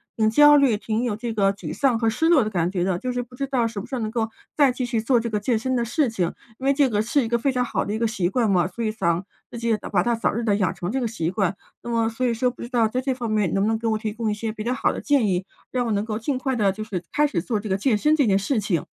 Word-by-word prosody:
挺 220 -1 +2
焦 295 +3 +7
虑， 270 -6 +4
挺 220 +2 -2
有 225 -4 -1
这 235 +1 -4
个 195 -1 +3
沮 195 - -7
丧 260 -5 +1
和 225 -1 +2
失 320 +9 0
落 315 -8 +5
的 215 - -2
感 175 -2 0
觉 180 -3 -1
的， 185 -1 0
就 250 +7 -3
是 245 0 -2
不 245 +1 -12
知 275 - -2
道 255 -4 +1
什 220 -3 -5
么 200 - -6
时 275 - -13
候 245 - -1
能 215 - -2
够 225 -1 -1 0.3
再 280 -4 +5
继 255 - -4
续 230 -2 0
做 235 +2 +2
这 230 0 -3
个 210 -1 -1
健 220 +1 0
身 260 +2 -1
的 235 -1 0
事 270 +2 +1
情， 180 -6 -1 0.2
因 265 - -7
为 275 - +4
这 275 -1 +3
个 210 -1 +1
是 260 +4 +1
一 - - -2
个 235 +1 +1
非 270 +3 0
常 250 -1 0
好 - - -2
的 205 - -3
一 220 - -2
个 230 - +2
习 195 -6 -1
惯 225 +1 +1
嘛， 180 -2 +3
所 230 +6 -6
以 215 - 0
想 175 -4 0 0.3
自 235 - -6
己 230 -2 +1 0.2
把 - - +4
它 240 -1 +1
早 225 - 0
日 235 +2 -2
地 205 -3 +2
养 190 -5 0
成 175 +3 -4
这 265 - -1
个 240 - -1
习 170 -7 -2
惯。 195 -1 0 0.3
那 - - -6
么 230 -1 +1
所 240 +3 -2
以 235 - +1
说 250 +2 +1
不 - - -14
知 - - -5
道 235 -3 +2
在 250 +3 -1
这 260 0 -1
方 240 -3 -4
面 210 -6 +1
能 195 - +1
不 - - +2
能 225 0 +1
给 230 0 -3
我 220 - +1
提 215 -1 -3
供 220 0 -2
一 - - 0
些 215 +1 -3
比 215 -1 -6
较 245 +2 0
好 - - +1
的 - - -5
建 280 -7 +2
议？ 185 0 0 0.3
让 250 -1 0
我 225 - -1
能 200 0 0
够 215 -1 -3
尽 260 +3 -1
快 265 -1 -1
地 200 -4 +2
就 215 +3 -6
是 190 -5 -5
开 295 0 +3
始 200 -12 -2
做 215 +1 -2
这 210 -1 -6
个 190 - +1
健 220 +2 +2
身 300 +8 +3
这 285 -5 +3
件 195 -2 +3
事 220 +4 0
情。 185 -6 -1
225 Hz, 370 characters per minute, -23 LUFS, 210-250 Hz, 0.3 s, 焦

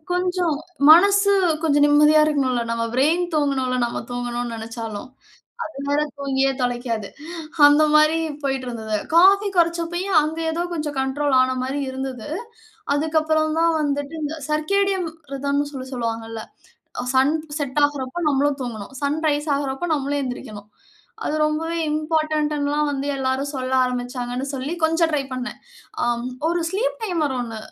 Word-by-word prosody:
கொஞ்சம் 360 -3 0 0.4
மனசு 400 +4 +7 0.3
கொஞ்சம் 290 -2 +4
நிம்மதியா 300 +1 +6
இருக்கணும்ல. 270 -5 +1
நம்ம 230 0 -1
ப்ரெயின் 315 +7 +3
தூங்கணும்ல்ல, 270 -4 +1
நம்ம 235 - -3
தூங்கணும்னு 245 -1 -3
நெனைச்சாலும். 225 0 -6 0.6
அது 315 - -10
வேற, 290 +1 +2 0.2
தூங்கியே 270 -1 +1
தொலைக்காது. 240 -4 -2 0.6
அந்த 295 +1 +5
மாரி 305 +1 +5 0.3
போய்ட்டு 270 -2 -1
இருந்தது. 220 -2 -3 0.2
காஃபி 395 +3 +6
கொறச்சப்பயே, 340 +2 +1
அங்க 315 +2 -3
எதோ 340 +2 -1
கொஞ்சம் 300 -3 -3
கண்ட்ரோல் 270 +1 0
ஆன 255 0 +1
மாரி 275 +2 -2
இருந்தது. 265 0 -5 0.7
அதுக்கப்பறம் 310 +1 +1
தான் 335 0 +3
வந்துட்டு, 285 +1 -2
இந்த 310 +2 -3
சர்க்கேடியம் 375 +3 +1 0.2
ரிதம்ன்னு 285 +1 -1
சொல்லி 260 -1 -6
சொல்லுவாங்கல. 225 -2 -4 0.6
அ - - -6
சன் 275 +4 +4 0.2
செட் 285 0 -1
ஆகுறப்ப 290 +3 -3
நம்மளும் 280 0 +1
தூங்கணும். 230 0 -6
சன் 295 +3 0
ரைஸ் 295 +1 -1
ஆகுறப்ப 280 +4 -2
நம்மளும் 285 0 -1
எந்திரிக்கணும். 215 -5 -7 0.6
அது 305 - -1
ரொம்பவே 325 +2 -1
இம்போர்டன்ட்டுன்னுல்லாம் 300 -1 0
வந்து 275 0 -3
எல்லாரும் 265 +2 -1
சொல்ல 260 -1 -3
ஆரம்பிச்சாங்கன்னு 250 +1 -3
சொல்லி, 270 +5 -3
கொஞ்சம் 325 +1 +3
ட்ரை 295 -2 +1
பண்னேன். 250 -1 -5 0.5
அ - - +2 0.4
ஒரு 345 0 0
ஸ்லீப் - - -1
டைமர் 325 -9 0
ஒண்ணு 230 -2 -5
285 Hz, 135 wpm, -22 LUFS, 255-315 Hz, 0.7 s, மனசு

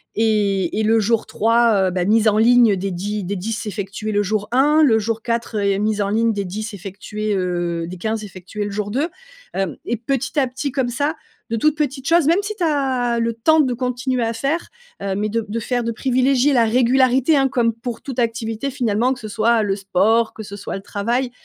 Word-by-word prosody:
Et 205 -4 +1
et 220 - +1
le 225 +1 +3
jour 225 +1 +1
3, 225 -3 +3
heu, - - -1
bah, 180 0 -1
mise 220 +3 +3
en 215 0 +3
ligne, 235 -1 +5
heu, - - -1
des 195 +1 -3
10 205 +3 -3
des 200 +3 -3
10 225 +5 -4
effectués 205 +1 -4
le 205 0 +2
jour 210 +1 -2
1. 295 +5 +4
Le 225 -6 +4
jour 225 +1 -2
4, 235 -1 -2 0.2
heu, - - -2
mise 210 +1 0
en 200 - 0
ligne 225 +1 +2
des 200 - -2
10 215 +4 -5
effectués, 205 +2 -5
heu, 175 -2 -1
des 185 +1 -7
15 220 +3 -2
effectués 195 +2 -6
le 205 - -4
jour 205 0 -3
2. 280 +8 0 0.5
Hem, 190 -6 -2
et 240 - -1
petit 270 +5 -3
à 265 - +2
petit, 270 +2 -4
comme 260 -3 0
ça, 285 +6 -1 0.4
de - - +1
toutes 305 +5 +2
petites 275 -3 -2
choses. 335 -2 +4
Même 335 +4 +4
si 420 +1 -5
tu 365 - -3
as 260 -6 +1
le 230 0 0
temps 315 +8 +3
de 260 -4 +2
continuer 250 0 -1
à 230 0 -1
faire, 285 +8 -2 0.3
heu, 195 -1 -2
mais 210 +2 -1
de 225 +1 -2
de 225 +3 -3
faire 245 +2 -1
de 230 - -1
privilégier 260 +3 +2
la 235 -3 +4
régularité 255 +4 +3
hein, 270 0 +3
comme 240 -3 +1
pour 230 0 -6
toute 260 -3 -5
activité 230 +2 -2
finalement. 245 -1 +1
Que 250 - -10
ce 215 - -7
soit 220 +2 +2
le 195 -2 0
sport, 200 +4 +1
que 220 - -8
ce 200 -1 -8
soit 205 - -5
le 195 - -6
travail. 235 +6 -2
225 Hz, 230 wpm, -20 LUFS, 205-255 Hz, 0.5 s, ligne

